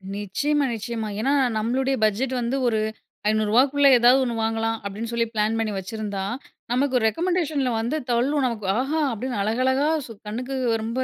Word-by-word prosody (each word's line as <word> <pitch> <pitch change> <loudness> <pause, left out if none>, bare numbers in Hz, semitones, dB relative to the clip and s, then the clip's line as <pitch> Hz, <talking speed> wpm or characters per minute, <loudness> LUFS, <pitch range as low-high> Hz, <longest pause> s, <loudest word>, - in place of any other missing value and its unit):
நிச்சயமா 280 +9 0
நிச்சயமா. 225 0 -4
ஏன்னா 270 +6 +1 0.2
நம்மளுடைய 260 +5 0
பட்ஜெட் 235 +5 0
வந்து 235 +3 -1
ஒரு 220 -2 +1 0.5
ரூ.500 215 -1 +1 0.2
க்குள்ள 285 0 +3
ஏதாவது 245 +3 +6
ஒண்ணு 240 -2 -2
வாங்கலாம் 225 0 0
அப்படின்னு 210 +3 -4
சொல்லி 235 0 +1
பிளான் 215 +1 +1
பண்ணி 220 -1 -1
வச்சிருந்தா, 200 0 -4 0.5
நமக்கு 260 +1 +2
ரெக்கமெண்டேஷன்ல 310 - 0
வந்து 240 +7 -1
தள்ளும், 265 +4 +1
நமக்கு. 230 -4 -3 0.2
ஆஹா! 295 +5 -1
அப்படின்னு 245 +1 -4
அழகழகா 260 +7 +1 0.2
சூ 230 - -10 0.2
கண்ணுக்கு 250 +5 -4 0.3
ரொம்ப 230 +3 -4
235 Hz, 150 wpm, -24 LUFS, 220-265 Hz, 0.5 s, ஏதாவது